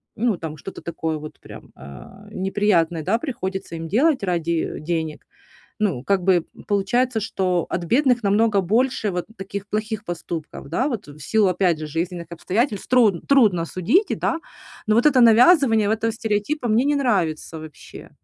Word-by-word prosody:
ну 220 Hz, -4 st, 0 dB
там 155 Hz, -2 st, -6 dB
что-то 190 Hz, +6 st, -9 dB
такое 160 Hz, -1 st, -3 dB
вот, 155 Hz, 0 st, -10 dB
прям, -, -, -13 dB
а, 65 Hz, -2 st, -13 dB
неприятное, 185 Hz, -4 st, 0 dB
да, 215 Hz, +8 st, +1 dB
приходится 190 Hz, -, -5 dB
им 165 Hz, 0 st, -6 dB
делать 265 Hz, -, +2 dB
ради, 170 Hz, -3 st, -1 dB, 0.3 s
э, -, -, -7 dB
денег. 160 Hz, -1 st, -4 dB, 0.5 s
Ну, 185 Hz, -13 st, -1 dB
как 195 Hz, 0 st, +1 dB
бы 180 Hz, -3 st, +3 dB, 0.2 s
получается, 225 Hz, +4 st, +1 dB
что 185 Hz, -4 st, -1 dB
от 175 Hz, -, -2 dB
бедных 245 Hz, -, +2 dB
намного 205 Hz, 0 st, +3 dB
больше 220 Hz, +2 st, 0 dB
вот 180 Hz, 0 st, -3 dB
таких 195 Hz, +1 st, -6 dB
плохих 215 Hz, 0 st, -3 dB
поступков, 165 Hz, -4 st, -6 dB
да, 260 Hz, -, 0 dB
вот 235 Hz, -, -4 dB
в 145 Hz, +1 st, -13 dB
силу, 210 Hz, +8 st, +2 dB
опять 180 Hz, -2 st, +1 dB
же, 155 Hz, -, -5 dB
жизненных 170 Hz, +2 st, -4 dB
обстоятельств, 205 Hz, -, -2 dB
тру 245 Hz, -5 st, +5 dB
трудно 215 Hz, -12 st, +3 dB
судить, 210 Hz, -, +1 dB
да, 330 Hz, -, -1 dB, 0.5 s
но 215 Hz, -, +3 dB
вот 235 Hz, +5 st, +3 dB
это 270 Hz, -4 st, +5 dB
навязывание 230 Hz, -, +5 dB
этого 225 Hz, +1 st, -1 dB
стереотипа 220 Hz, +5 st, -2 dB
мне 225 Hz, +4 st, +2 dB
не 290 Hz, +1 st, +2 dB
нравится 180 Hz, -, -1 dB
вообще. 155 Hz, -1 st, -12 dB
200 Hz, 165 wpm, -22 LUFS, 170-230 Hz, 0.5 s, тру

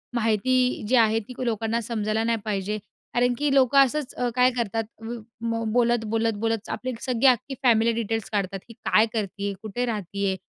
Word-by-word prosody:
माहिती 245 Hz, +3 st, +1 dB
जी 255 Hz, -, +3 dB
आहे 225 Hz, -2 st, +4 dB
ती 225 Hz, +3 st, -10 dB
लोकांना 225 Hz, 0 st, 0 dB
समजायला 215 Hz, -1 st, -1 dB
नाही 230 Hz, 0 st, +1 dB
पाहिजे. 210 Hz, 0 st, -2 dB, 0.4 s
कारण 245 Hz, 0 st, +2 dB
की 290 Hz, 0 st, +1 dB
लोकं 270 Hz, 0 st, +4 dB
असंच 285 Hz, +1 st, -3 dB
अ, 245 Hz, -1 st, 0 dB
काय 250 Hz, 0 st, +5 dB
करतात 225 Hz, -1 st, -1 dB, 0.2 s
उ, 235 Hz, +1 st, -5 dB, 0.2 s
म 230 Hz, 0 st, -1 dB
बोलत, 240 Hz, -1 st, +2 dB
बोलत, 225 Hz, 0 st, +1 dB
बोलत 225 Hz, -1 st, -1 dB
आपली 255 Hz, 0 st, -3 dB
सगळी 255 Hz, -1 st, 0 dB
अख्खी 255 Hz, +2 st, +2 dB
फॅमिली 230 Hz, -2 st, +4 dB
डिटेल्स 225 Hz, -1 st, -3 dB
काढतात. 195 Hz, -2 st, -1 dB
ही -, -, -10 dB
काय 220 Hz, 0 st, +3 dB
करती 200 Hz, -2 st, -3 dB
आहे? 200 Hz, -, -1 dB
कुठे 220 Hz, +3 st, -3 dB
राहती 200 Hz, -3 st, -3 dB
आहे? 190 Hz, -, 0 dB
230 Hz, 190 wpm, -25 LUFS, 215-245 Hz, 0.4 s, काय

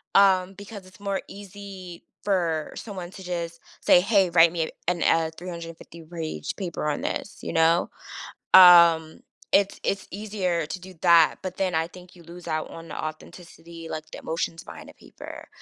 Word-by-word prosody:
um, 190 Hz, -1 st, +4 dB
because 205 Hz, 0 st, -10 dB
it's 185 Hz, +1 st, -18 dB
more 200 Hz, -1 st, -2 dB
easy 195 Hz, -3 st, -10 dB, 0.2 s
for 170 Hz, -6 st, 0 dB
someone 190 Hz, -5 st, -7 dB
to 190 Hz, -, -11 dB
just 170 Hz, -2 st, -4 dB, 0.2 s
say, -, -, +6 dB
"Hey, 195 Hz, -2 st, +3 dB
write 170 Hz, -1 st, +6 dB
me 165 Hz, -2 st, -1 dB, 0.2 s
an 175 Hz, -1 st, +1 dB
a 165 Hz, -1 st, +2 dB
350 170 Hz, -1 st, -9 dB
page 160 Hz, -, -5 dB
paper 170 Hz, -5 st, -3 dB
on 145 Hz, -, -2 dB
this," -, -, -4 dB
you -, -, -5 dB
know? 165 Hz, +2 st, +3 dB, 0.7 s
Um, 170 Hz, -3 st, +8 dB, 0.3 s
it's 200 Hz, 0 st, +2 dB
it's 195 Hz, -, -1 dB
easier 190 Hz, -4 st, -2 dB
to 180 Hz, +4 st, -6 dB
do 185 Hz, +1 st, -12 dB
that, 170 Hz, -3 st, +6 dB
but 185 Hz, -1 st, -5 dB
then 185 Hz, -3 st, -1 dB
I 160 Hz, 0 st, +1 dB
think 180 Hz, 0 st, -15 dB
you 175 Hz, -, -15 dB
lose 170 Hz, +1 st, -12 dB
out 155 Hz, -1 st, -2 dB
on 165 Hz, 0 st, -10 dB
the -, -, -7 dB
authenticity, 165 Hz, +1 st, -10 dB
like 155 Hz, 0 st, -6 dB
the -, -, -7 dB
emotions 165 Hz, 0 st, -4 dB
behind -, -, -11 dB
the -, -, -14 dB
paper. -, -, -12 dB
175 Hz, 175 wpm, -25 LUFS, 165-190 Hz, 0.7 s, Um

